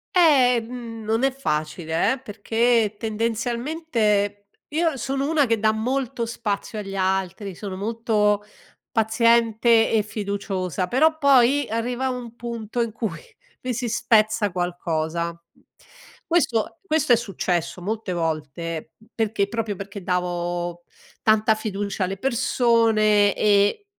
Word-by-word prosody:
Ehm, 245 -7 +3
non 225 +4 0
è 270 - +3
facile 160 - -1
eh, 265 - -6
perché 225 0 +1
tendenzialmente, 225 -2 -1 0.2
io 320 -1 0
sono 275 +3 -2
una 310 -3 +3
che 230 -2 +1
dà 215 0 +3
molto 245 +2 -2
spazio 215 -2 -3
agli 195 -1 -6
altri, 190 0 -1
sono 195 -1 -6
molto 210 -1 +1 0.5
paziente 230 0 +3
e 220 -2 +2
fiduciosa 200 -4 -3
però 315 +9 +3
poi, 280 -1 +4
arriva 245 +3 -1
un 245 -2 -6
punto 235 -1 -4
in 230 -1 -1
cui 220 -1 -4 0.4
mi 255 0 -2
si 240 +1 -2
spezza 215 -2 +2
qualcosa. 170 -2 -2 0.9
Questo 330 -6 +1
questo 310 -7 +3
è - - +8
successo 180 -5 -2
molte 215 0 -3
volte, 160 0 -3 0.2
perché 215 -3 0
proprio 220 -1 -3
perché 200 0 -8
davo 175 -1 -2 0.4
tanta 220 0 +3
fiducia 205 -2 -3
alle 190 +1 -2
persone 225 -4 +3
e 205 - +2
220 Hz, 120 wpm, -23 LUFS, 195-240 Hz, 0.9 s, è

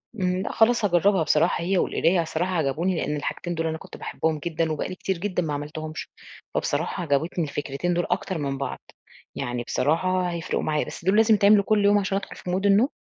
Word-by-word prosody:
امم، 185 -3 0
لأ - - -3
خلاص 230 0 +3
هاجرَّبها 190 0 +3
بصراحة، 155 +2 +2
هي 190 +2 +1
والقراية، 175 0 +2
بصراحة 165 +3 -2
عجبوني 165 +4 0
لأن 150 -2 -1
الحاجتين 175 +4 -3
دول 165 0 -1
أنا 160 0 -2
كنت - - -12
باحبهم 160 -1 -2
جدًا، 160 +1 -1
وبقى 155 - -2
لي 185 - -6
كتير 190 0 -2
جدًا 180 0 -1
ما 155 -2 -2
عملتهُمش، 155 +2 -5 0.5
فبصراحة 180 - -1
عجبتني 160 +3 0
الفكرتين 145 +3 -2
دول 175 0 0
أكتر 190 - -1
من 140 -2 -2
بعض، 140 - -4 0.6
يعني 120 0 -3
بصراحة 180 +8 +1
هيفرِقوا 170 -1 -2
معايا، 150 -1 0
بس - - -9
دول 190 +3 +3
لازم 225 0 +5
يتعملوا 205 0 +5
كل 210 0 +2
يوم 205 0 +5
عشان 195 -1 -1
أدخل 200 - -6
في 180 - -6
Mood 190 +2 0
النوم؟ 205 +7 +5
175 Hz, 205 wpm, -25 LUFS, 155-195 Hz, 0.6 s, لازم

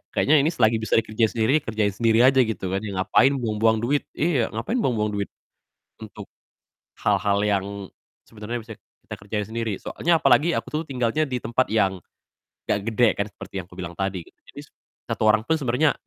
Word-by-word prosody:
"Kayaknya 150 +1 +4
ini 145 - +2
selagi 110 -1 +3
bisa 110 - 0
dikerjain 110 0 +2
sendiri, 120 +7 +3
kerjain 110 -6 -1
sendiri 115 +3 +3
aja," 130 0 +5
gitu 110 -6 0
kan, 95 - 0
ya. 100 -2 -6
"Ngapain 130 +9 +3
buang-buang 110 -2 +1
duit" 140 +4 0
iya, 150 -7 +1
ngapain 225 - -2
buang-buang 105 - 0
duit, 100 - -2 0.7
untuk - - -11 0.7
hal-hal 100 -1 +2
yang 100 -2 +1 0.6
sebenernya 110 +2 -6
bisa 110 0 -10
kita - - -13
kerjain 105 +1 -4
sendiri. 115 -1 -2
Soalnya 170 -1 0
apalagi 165 +3 +4
aku - - -3
tuh 155 +1 -2
tinggalnya 130 +3 0
di 125 -2 -3
tempat 130 +2 0
yang 95 -4 +1 0.7
nggak - - 0
gede 115 +2 +3
kan 100 - -2
seperti - - -12
yang 85 - -15
aku - - -15
bilang 90 -2 -5
tadi 95 0 -3
gitu. - - -23
Jadi, - - -11
s - - -28 0.4
satu 110 - -1
orang 110 0 +3
tuh 160 - +1
sebenernya, 140 +3 +2
115 Hz, 185 wpm, -23 LUFS, 105-130 Hz, 0.7 s, aja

